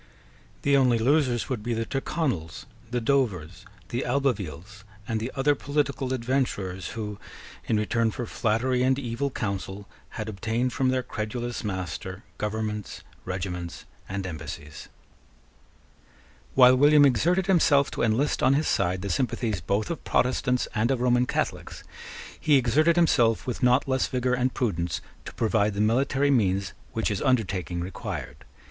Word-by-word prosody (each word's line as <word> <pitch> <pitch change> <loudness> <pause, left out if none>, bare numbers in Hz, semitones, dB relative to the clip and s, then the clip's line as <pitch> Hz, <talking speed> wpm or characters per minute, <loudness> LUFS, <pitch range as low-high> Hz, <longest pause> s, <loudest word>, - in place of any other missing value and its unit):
The 140 0 +4
only 125 -3 +4
losers 130 0 +2
would 130 -5 -3
be 120 +2 -2
the 115 0 -1
Tyrconnels, 130 - -2 0.2
the 120 +1 -1
Dovers, 110 - -1 0.2
the 120 - -2
Albevilles, 105 - -2 0.2
and 110 -1 -1
the 115 +4 -4
other 140 +2 +3
political 140 -2 -1
adventurers 115 - -2
who, 105 -2 -5 0.5
in 110 - +2
return 115 +2 +1
for 120 +2 -4
flattery 120 +3 0
and 130 +1 +3
evil 125 +1 -2
counsel, 100 -3 -4 0.3
had 110 -1 -4
obtained 115 +4 -1
from 130 -1 +1
their 130 0 0
credulous 120 +3 -4
master 95 0 -5 0.2
governments, 105 -1 -3 0.2
regiments, 90 -2 -5 0.2
and 95 0 -3
embassies. 75 -3 -7 1.7
While 130 -1 +7
William 145 +1 +6
exerted 175 +8 +2
himself 150 -7 +4
to - - -4
enlist 115 +6 +1
on 135 - +4
his 155 +3 +1
side 90 +2 0
the 100 - -3
sympathies 115 -3 -1
both 100 - -1
of 170 - -5
Protestants 125 0 +1
and 110 +3 +1
of 135 -2 +1
Roman 125 0 +2
Catholics, - - -3 0.6
he 150 - +3
exerted 145 +6 +3
himself 125 -10 +3
with 125 - -4
not 125 +2 +3
less 130 -1 +1
vigour 125 0 0
and 125 +1 +1
prudence 85 -10 -1 0.3
to - - -8
provide 110 -2 +1
the - - -3
military 135 +6 +2
means 100 -6 +1 0.2
which 110 - 0
his 100 -2 -2
undertaking 95 -8 0
required. 75 -6 -6
120 Hz, 145 wpm, -26 LUFS, 100-130 Hz, 1.7 s, While